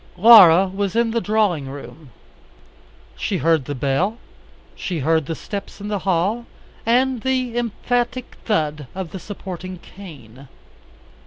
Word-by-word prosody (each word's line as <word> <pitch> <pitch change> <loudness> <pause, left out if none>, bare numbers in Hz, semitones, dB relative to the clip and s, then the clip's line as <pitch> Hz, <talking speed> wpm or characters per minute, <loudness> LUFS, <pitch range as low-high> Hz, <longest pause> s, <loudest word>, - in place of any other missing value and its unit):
Laura 190 -4 +8
was 195 +1 -3
in 235 -1 +2
the 230 0 0
drawing 205 -11 0
room. 145 +1 -10 1.1
She 195 - -2
heard 160 -4 +2
the 145 - -4
bell, 145 - 0 0.6
she 180 - -4
heard 160 0 +1
the 165 - -3
steps 200 +4 -7
in 205 +1 -6
the 205 -1 -1
hall, 195 +6 0 0.4
and 250 +1 +2
the 255 -2 -1
emphatic 240 +2 -2
thud 150 - -1
of 185 -3 -5
the 190 - -6
supporting 185 -2 -7
cane. 140 - -13
190 Hz, 135 wpm, -21 LUFS, 160-225 Hz, 1.1 s, Laura